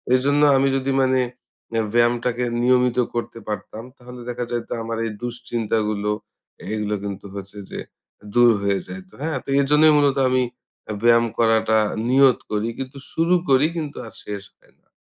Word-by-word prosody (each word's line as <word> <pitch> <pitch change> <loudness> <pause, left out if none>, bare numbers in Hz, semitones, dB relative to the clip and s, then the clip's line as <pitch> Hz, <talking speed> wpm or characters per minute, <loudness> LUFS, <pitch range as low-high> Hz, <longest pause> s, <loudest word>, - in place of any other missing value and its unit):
এজন্য 145 +3 +2 0.2
আমি 135 +1 +3
যদি 135 0 0
মানে 130 0 +3 0.6
এ - - +3
ব্যায়ামটাকে 120 +1 +2 0.2
নিয়মিত 125 0 +3 0.2
করতে 115 0 -4
পারতাম, 110 +1 -5
তাহলে 125 0 -11
দেখা 120 0 -3
যাইতো 120 -1 -3
আমার 115 0 -4
এই 110 - -3
দুশ্চিন্তাগুলো, 110 -3 -2 0.6
এগুলা 105 -1 -1
কিন্তু 100 -1 -6
হচ্ছে 100 +1 -8
যে - - -5 0.5
দূর 120 0 +6
হয়ে 100 -1 +1
যাইত। 95 0 -9
হ্যাঁ? 155 -2 -1
তো - - -10
এজন্যই 150 +2 +5
মূলত 140 -1 +3
আমি 130 0 +2 0.6
ব্যায়াম 120 0 +5
করাটা 110 -1 +3 0.3
নিয়ত 135 -1 +5
করি। 105 +2 0
কিন্তু 135 +1 -6
শুরু 170 +2 +2
করি, 135 +2 +5
কিন্তু 150 -3 -4
আর - - -13
শেষ 100 -1 -5
হয় - - -28
না। - - -41
120 Hz, 155 wpm, -22 LUFS, 110-130 Hz, 0.6 s, দূর